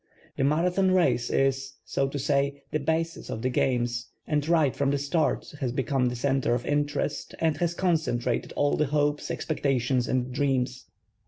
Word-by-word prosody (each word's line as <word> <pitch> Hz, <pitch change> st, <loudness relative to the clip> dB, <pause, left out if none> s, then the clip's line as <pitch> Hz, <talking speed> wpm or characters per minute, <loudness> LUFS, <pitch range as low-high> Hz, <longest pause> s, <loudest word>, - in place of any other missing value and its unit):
The -, -, 0 dB
Marathon 175 Hz, +6 st, +2 dB
race 175 Hz, -10 st, +2 dB
is, 135 Hz, 0 st, +1 dB
so 135 Hz, -, 0 dB
to 140 Hz, -, -4 dB
say, 140 Hz, 0 st, 0 dB
the 155 Hz, -, 0 dB
basis 160 Hz, +3 st, -2 dB
cf 110 Hz, -, -4 dB
the 130 Hz, -, +1 dB
games 120 Hz, -1 st, 0 dB, 0.2 s
and 150 Hz, 0 st, -1 dB
right 155 Hz, -6 st, +3 dB
from 140 Hz, 0 st, +1 dB
the 140 Hz, -, +1 dB
start 145 Hz, +4 st, 0 dB
lias 125 Hz, -3 st, 0 dB
become 135 Hz, -1 st, 0 dB
the 125 Hz, -, -2 dB
center 135 Hz, -1 st, +1 dB
of 120 Hz, -, -4 dB
interest 145 Hz, 0 st, -1 dB
and 160 Hz, -2 st, +1 dB
has 175 Hz, -1 st, 0 dB
concentrated 155 Hz, -10 st, 0 dB
all 145 Hz, 0 st, +2 dB
the 150 Hz, -, +2 dB
hopes, 145 Hz, +1 st, 0 dB
expectations 130 Hz, -4 st, 0 dB
and 125 Hz, 0 st, -1 dB
dreams. 130 Hz, -2 st, -1 dB
140 Hz, 170 wpm, -27 LUFS, 130-150 Hz, 0.2 s, right